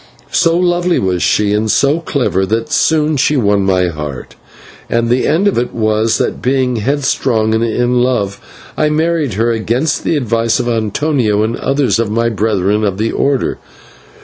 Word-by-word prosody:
So 165 -1 +2
lovely 175 0 +1
was 90 -2 -1
she 105 -1 +1
and 110 +1 0
so 140 +8 +2
clever, 130 - -1
that 115 +3 -2
soon 155 -1 +2
she 145 +3 +2
won 100 -4 +2
my 95 -2 +1
heart, 75 -5 -7 0.6
and 115 0 0
the 125 +1 +1
end 175 +6 +2
of 200 - +1
it 120 - -4
was 110 0 +1
that, - - -2
being 130 -1 0
headstrong 115 -3 0
and 110 +1 +1
in 120 +2 +1
love, 105 -6 -1 0.3
I 150 - +1
married 155 - 0
her, 115 +3 +1
against 120 +7 -1
the 160 - 0
advice 115 -3 0
of 120 - -2
Antonio 115 -1 0
and 115 +2 -1
others 135 -3 0
of 115 -2 0
my 115 +2 0
brethren 105 -1 0
of 100 -2 -1
the 110 +2 -1
Order. 140 -2 -1
115 Hz, 175 wpm, -14 LUFS, 105-140 Hz, 0.6 s, So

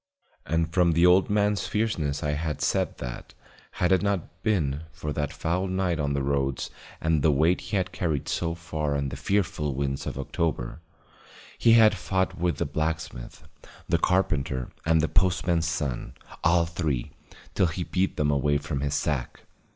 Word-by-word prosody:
And 80 +1 0
from 90 -2 +4
the 85 +2 +4
old 90 +2 +5
man's 105 0 +1
fierceness 85 -10 -1
I 75 - 0
had 75 0 -2
said - - 0
that, - - -7 0.4
had 90 - +1
it 95 - +4
not 95 -3 -2
been 80 -8 0
for 75 -1 -5
that 75 -2 -2
foul 90 +4 -1
night 95 -3 0
on 70 -1 0
the 70 -1 -1
roads 70 -1 -1 0.3
and 80 -2 +1
the 80 - +4
weight 80 +6 +3
he 105 - -2
had 95 0 -1
carried 80 -6 -2
so 85 -1 -1
far 75 -3 -2
and 70 -1 -1
the - - -4
fearful 85 -8 0
winds 70 0 -2
of - - -4
October, 70 -1 -2 0.8
he 115 - +5
had 110 -2 +7
fought 95 0 -1
with 85 0 0
the 85 - 0
blacksmith, 80 -4 -4 0.4
the - - +2
carpenter 75 -9 0 0.2
and 80 -1 +4
the 80 - +1
postman's 85 -2 +2
son, 75 -7 -3 0.3
all 85 -1 +4
three, 80 -7 -2 0.4
till 90 - +3
he 85 +2 -3
beat 95 +2 -1
them 75 -1 +2
away 70 +1 +2
from 70 0 -3
his 70 +1 -1
sack. 70 -5 -2
80 Hz, 175 wpm, -26 LUFS, 70-90 Hz, 0.8 s, had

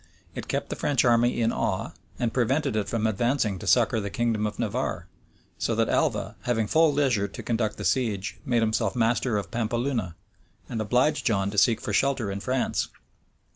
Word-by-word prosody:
It - - -6
kept - - -2
the - - -2
French 140 -4 +1
army 120 0 +3
in 115 - +2
awe, 95 -2 -1 0.3
and 120 -2 -1
prevented 135 +1 +1
it 105 -2 -1
from 115 -2 -1
advancing 110 -2 0
to - - -8
succor 110 - +4
the 100 -1 -3
kingdom 110 0 0
of 105 - -6
Navarre; - - -2 0.5
so - - 0
that - - +1
Alva, - - 0
having 115 -3 0
full 160 +7 +4
leisure 130 -8 +1
to 100 - -9
conduct 115 -2 -1
the - - -5
siege, 110 -7 0
made 120 -2 +1
himself 110 +3 0
master 120 -1 +1
of 100 - -4
Pampeluna, 120 -4 -1 0.5
and 115 -2 -3
obliged 125 +5 +1
John 100 -4 +1
to 105 - -7
seek 110 +3 +4
for 105 - -4
shelter 130 -3 +1
in 100 - -4
France. 130 +4 -1
115 Hz, 185 wpm, -26 LUFS, 105-125 Hz, 0.5 s, succor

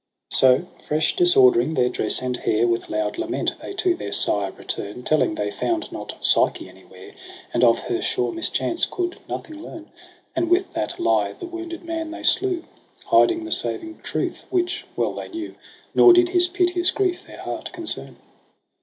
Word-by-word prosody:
So 130 +5 +4 0.2
fresh 155 +1 0
disordering 360 - +4
their 125 - +2
dress 115 0 +2
and 125 0 -2
hair, 115 -1 0
With 115 0 -1
loud 105 0 -2
lament - - -2
they 395 - -8
to 365 -2 +2
their 345 - -7
sire 100 -2 +3
return. 105 +6 -5
Telling 155 +2 +1
they 105 -5 -3
found 335 - -3
not - - -7
Psyche - - +3
anywhere. - - -15 0.4
And - - +1
of - - +5
her 360 -1 -3
sure 385 +1 -1
mischance 335 0 0
could 355 -1 -4
nothing 310 -1 -7
learn: 325 -1 -11 0.4
And 335 0 0
with 360 +2 +1
that - - -4
lie 345 - +1
the 355 - -9
wounded 340 -1 -7
man 330 -1 -4
they 330 - -8
slew. 365 -4 +3 0.4
Hiding 340 -1 +3
the 330 - -7
saving 330 -2 -1
truth - - -4
which 355 -2 -2
well - - -1
they - - -7
knew 330 -1 -6
j - - -18 0.4
Nor 360 - +7
did 355 0 +4
his 355 0 +5
piteous 355 0 +2
grief 370 -2 -1
their - - -12
heart - - -6
concern. 340 -2 0
340 Hz, 175 wpm, -22 LUFS, -, 0.4 s, Nor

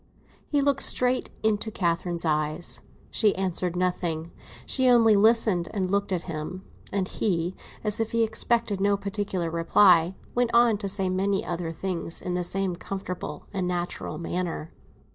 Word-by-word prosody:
He 290 -1 +1
looked 275 -1 +2
straight 250 0 +3
into 220 0 +1
Catherine's 170 -3 -2
eyes. 155 +2 -1 0.3
She 210 -3 +3
answered 185 -2 -1
nothing; 175 -2 -1 0.3
she 260 -1 +3
only 230 -3 +6
listened, 215 -4 +3
and 190 -2 -1
looked 200 0 0
at 180 -2 -1
him; 165 +3 -6 0.3
and 190 -2 -1
he, 175 -4 -1 0.3
as 210 -1 +3
if 225 -1 -1
he 230 0 +2
expected 220 -2 0
no 200 0 +3
particular 195 -4 -3
reply, 170 +1 +4 0.2
went 245 -1 +1
on 235 -3 +5
to 200 -2 -3
say 195 -1 +3
many 195 +2 0
other 170 -1 -3
things 170 0 -4
in 180 - -4
the 180 0 -1
same 190 0 -1
comfortable 185 0 -6
and 190 -2 -1
natural 175 -3 -3
manner. 170 -1 -4
190 Hz, 155 wpm, -26 LUFS, 175-210 Hz, 0.3 s, only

